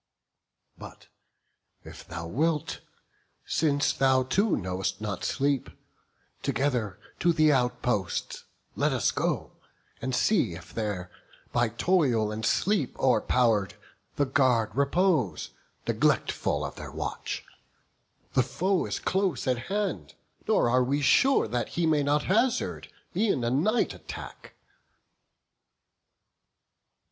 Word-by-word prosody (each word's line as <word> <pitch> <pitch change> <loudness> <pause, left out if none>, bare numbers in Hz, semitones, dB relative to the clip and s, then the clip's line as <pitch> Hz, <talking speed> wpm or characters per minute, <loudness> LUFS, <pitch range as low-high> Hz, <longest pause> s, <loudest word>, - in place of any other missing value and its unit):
But - - -12 0.7
if - - -12
thou 85 0 -6
wilt, 150 - -1 0.6
since 145 -3 +1
thou 130 -1 +3
too 195 - +1
know'st 95 0 -3
not 105 -3 -4
sleep, 140 -1 0 0.7
Together 120 -9 -1 0.2
to 170 - +3
the 155 -2 +4
outposts 125 -6 -1 0.3
let - - +1
us - - +1
go, - - -2 0.5
And 130 +1 -1
see 125 - +2
if 85 - -12
there, 100 -5 -3 0.4
by 120 -1 +2
toil 120 - +2
and 110 +1 -5
sleep 190 - +1
o'erpow'r'd, 115 -6 +2 0.4
The 145 - +2
guard 125 -6 +2
repose, 140 - +1 0.4
neglectful - - +1
of - - -7
their - - -8
watch. - - -5 0.9
The 130 - +4
foe 165 +10 0
is - - -2
close 190 -9 -1
at 125 -1 -1
hand; 190 - -2 0.3
nor - - +3
are 125 +2 +3
we 140 +3 0
sure 265 - +4 0.2
He 170 - -1
may 155 -2 +3
not 145 +1 +1
hazard 235 +6 0 0.2
e'en 195 - +1
a 120 - 0
night 195 - +1
attack." - - -10
130 Hz, 115 wpm, -27 LUFS, 115-165 Hz, 0.9 s, the